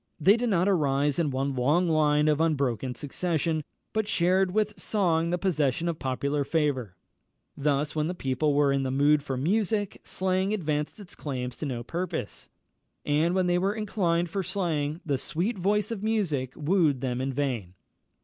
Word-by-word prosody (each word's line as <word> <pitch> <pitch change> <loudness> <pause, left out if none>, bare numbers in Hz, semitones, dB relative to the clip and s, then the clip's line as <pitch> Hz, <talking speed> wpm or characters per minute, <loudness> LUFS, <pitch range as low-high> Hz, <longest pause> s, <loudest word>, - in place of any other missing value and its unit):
They 190 +7 +6
did 240 0 -1
not 185 -2 +2
arise 145 -5 +2
in 160 -3 +2
one 135 +1 -1
long 150 +8 +2
line 150 -2 +3
of 150 0 +2
unbroken 135 -6 0
succession, 160 +2 -1 0.3
but 220 -1 0
shared 185 +1 +2
with 210 +2 -1
song 170 -6 +1
the 175 - +1
possession 165 -4 0
of 170 -2 -2
popular 140 +2 -1
favour. 135 - -1 0.6
Thus, 145 +1 0
when 155 0 0
the 180 - -3
people 140 0 0
were 145 -1 +3
in 135 - +1
the 135 - -1
mood 145 +3 +3
for 135 -2 -4
music, 205 - 0
slang 190 +2 0
advanced 150 -2 -2
its 200 -4 -10
claims 125 -4 -4
to 155 - -4
no 120 -3 -4
purpose; 170 - -4 0.6
and 155 +4 +2
when 185 -1 +2
they 175 0 +2
were 195 +3 0
inclined 180 -6 0
for 195 +4 -2
slang, 165 -5 -2
the 140 -4 0
sweet 190 - -2
voice 210 +4 +1
of 220 -4 -4
music 175 - 0
wooed 155 -4 +2
them 125 -1 -2
in 135 +1 -1
vain. 125 -10 -2
155 Hz, 175 wpm, -27 LUFS, 140-185 Hz, 0.6 s, They